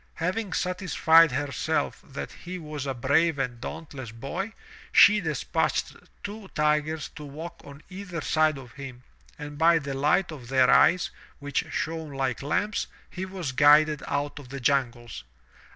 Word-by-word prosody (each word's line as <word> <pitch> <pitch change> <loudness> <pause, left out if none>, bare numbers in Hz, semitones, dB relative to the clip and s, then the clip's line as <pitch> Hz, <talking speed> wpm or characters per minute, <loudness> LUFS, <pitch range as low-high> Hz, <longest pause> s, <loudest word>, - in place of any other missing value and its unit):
Having 185 +4 -2
satisfied 170 -3 +4
herself 135 0 -1
that - - -7
he 180 +1 -8
was 150 -4 -6
a 135 - -2
brave 145 +6 +2
and 125 -3 -3
dauntless 140 -5 -7
boy, 170 - -5 0.4
she 210 0 +7
despatched 155 -5 -1 0.3
two 205 0 -7
tigers 150 +1 +1
to 150 - -11
walk 160 +4 -8
on 140 +1 -12
either 185 -2 -6
side 155 -1 +2
of 125 -3 -11
him, 130 -2 -9 0.3
and 145 -1 -8
by 165 +1 +6
the 140 -3 -4
light 150 +7 +2
of 135 -6 -9
their 130 0 +4
eyes, 175 +1 +4 0.3
which 145 -1 -2
shone 160 -2 -3
like 135 -2 -2
lamps, 205 +9 -1 0.2
he 190 +1 -5
was 185 -7 -4
guided 150 +2 +5
out 145 +1 -2
of 135 -3 -12
the 140 +1 -6
jungles. 120 - -1
150 Hz, 150 wpm, -26 LUFS, 135-170 Hz, 0.4 s, she